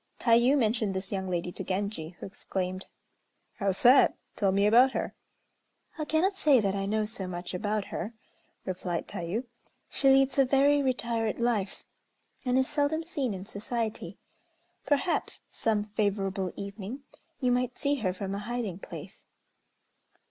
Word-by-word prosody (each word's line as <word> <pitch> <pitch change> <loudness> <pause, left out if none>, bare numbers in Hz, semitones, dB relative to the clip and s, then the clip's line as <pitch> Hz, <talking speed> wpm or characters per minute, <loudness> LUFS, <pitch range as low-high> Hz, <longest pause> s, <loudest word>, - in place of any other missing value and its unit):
Tayû 240 +4 +5
mentioned 220 -5 +1
this 190 +1 -4
young 190 -2 -2
lady 175 0 -2
to 190 - -6
Genji, 185 -3 -3
who - - -6
exclaimed: 185 -1 -4 0.7
"How 195 -2 +2
sad! 245 +8 +6 0.2
Tell 195 -2 +2
me 200 +1 +2
all 205 - +5
about 250 +4 +6
her." - - -2 0.9
"I 305 - -1
cannot 330 +6 +2
say 295 -8 +4
that 200 -3 +1
I 195 0 -2
know 215 +1 +1
so 210 -3 -5
much 175 0 -5
about 205 +2 -1
her," 215 +6 -4 0.5
replied 180 -2 -3
Tayû. 175 +8 -3 0.5
"She 270 - +3
leads 270 0 +4
a 270 - +6
very 280 +2 +4
retired 235 -4 0
life, 225 -5 -1 0.6
and 250 +1 +3
is 260 0 +3
seldom 295 +2 0
seen 275 - -2
in 185 +1 -7
society. 215 -3 -4 0.7
Perhaps, 290 +4 0
some 215 -2 0
favorable 195 -3 -1
evening, 200 +6 -6 0.4
you 250 -1 +2
might 250 0 0
see 285 0 +1
her 205 -7 0
from 195 +1 -4
a 200 - -2
hiding 215 -4 -3
place. - - -10
215 Hz, 155 wpm, -29 LUFS, 195-255 Hz, 0.9 s, sad